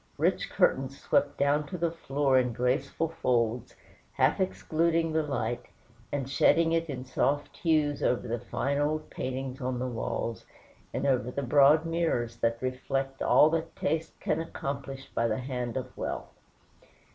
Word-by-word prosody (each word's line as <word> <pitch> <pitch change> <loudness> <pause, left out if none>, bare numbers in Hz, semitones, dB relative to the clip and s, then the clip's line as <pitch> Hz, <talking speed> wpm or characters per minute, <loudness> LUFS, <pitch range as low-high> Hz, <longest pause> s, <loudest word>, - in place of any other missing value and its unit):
Rich - - +1
curtains 135 +1 +1
swept 145 0 +1
down 145 +1 +2
to 180 - -5
the 170 -1 0
floor 140 -4 +2
in 125 -2 0
graceful 125 +7 0
folds, 120 -6 0 0.4
half - - +2
excluding 165 -3 +1
the 160 - +3
light, 120 -5 -2 0.4
and 135 -3 -2
shedding 165 +4 +4
it 165 0 0
in 130 -2 -5
soft 140 +3 0
hues 155 -4 +1
over 125 0 +1
the 120 +1 -2
fine 140 +5 -1
old 155 +1 -1
paintings 130 0 -4
on 125 0 -1
the 125 - -2
walls, 115 -1 -3 0.5
and - - -2
over 125 -3 +2
the 140 +2 -3
broad 145 +4 +5
mirrors 160 -9 -1
that 115 0 +1
reflect 135 +1 -2
all 155 - +6
that 165 0 -2
taste 160 +2 -2
can 155 +1 0
accomplish 140 -3 -5
by 115 - +1
the 110 -1 0
hand 125 -2 -3
of 130 - -5
wealth. - - -4
135 Hz, 160 wpm, -29 LUFS, 125-155 Hz, 0.5 s, all